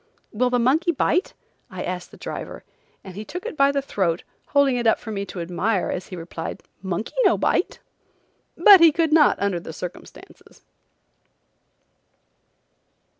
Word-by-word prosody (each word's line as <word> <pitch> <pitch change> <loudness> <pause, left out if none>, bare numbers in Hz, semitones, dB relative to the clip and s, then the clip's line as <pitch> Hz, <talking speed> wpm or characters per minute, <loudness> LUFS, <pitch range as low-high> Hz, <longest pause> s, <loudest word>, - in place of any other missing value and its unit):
"Will 250 +3 +1
the 250 - +1
monkey 280 +9 +2
bite?" 340 +3 0 0.3
I 185 -2 -6
asked 180 -1 -5
the - - -15
driver, - - -7 0.4
and 190 - -10
he 210 - -6
took 360 - -8
it 470 - -5
by 275 -1 +4
the 280 -1 -1
throat, 185 -9 -1 0.2
holding 280 -3 +3
it 240 -1 0
up 225 - +4
for 220 - -8
me 200 -1 -4
to 180 - -8
admire 180 +4 -1
as 180 - -5
he 185 - -8
replied: 165 -1 -7 0.2
"Monkey 190 +3 -4
no - - +4
bite." - - 0 0.8
But 405 -4 +8
he 335 -1 +7
could 320 0 0
not 310 -2 +5
under 200 -3 0
the 165 - -9
circumstances. 180 +2 -11
225 Hz, 160 wpm, -23 LUFS, 185-285 Hz, 0.8 s, But